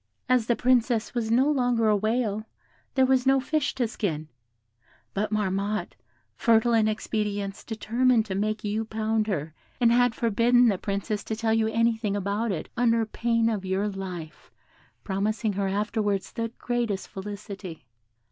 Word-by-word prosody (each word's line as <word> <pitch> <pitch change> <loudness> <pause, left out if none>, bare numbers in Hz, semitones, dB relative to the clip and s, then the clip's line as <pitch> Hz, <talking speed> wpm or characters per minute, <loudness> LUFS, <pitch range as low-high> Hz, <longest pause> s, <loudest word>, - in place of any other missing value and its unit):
"As 250 -3 +2
the 240 - +3
Princess 245 -2 +2
was 235 -3 -1
no 250 +5 +4
longer 245 -5 +2
a 210 - +4
whale, 215 0 -1 0.5
there 265 -1 +5
was 260 0 +2
no 270 0 +5
fish 295 +2 -1
to 250 -3 0
skin; 160 -8 -3 0.8
but 210 +2 -1
Marmotte, 205 0 -1 0.4
fertile 230 +1 +3
in 220 -1 +4
expedients, 210 -2 -2
determined 230 +1 +1
to 200 - -4
make 215 +2 -1
you 210 +1 -1
pound 220 0 -1
her, 160 -6 -2 0.3
and 235 -2 +4
had 245 -1 +3
forbidden 235 +2 +4
the 195 -3 0
Princess 200 +1 -2
to 220 - -2
tell 220 0 0
you 225 -1 +2
anything 225 -2 +1
about 205 +3 -1
it, 175 - -3
under 230 -1 +2
pain 230 +1 0
of 215 -4 -1
your 190 +2 0
life, 185 -5 -7 0.5
promising 210 +2 -1
her 195 0 -1
afterwards 205 -1 -1
the 230 0 -2
greatest 235 -5 -2
felicity. 195 -4 -8
220 Hz, 155 wpm, -26 LUFS, 200-235 Hz, 0.8 s, there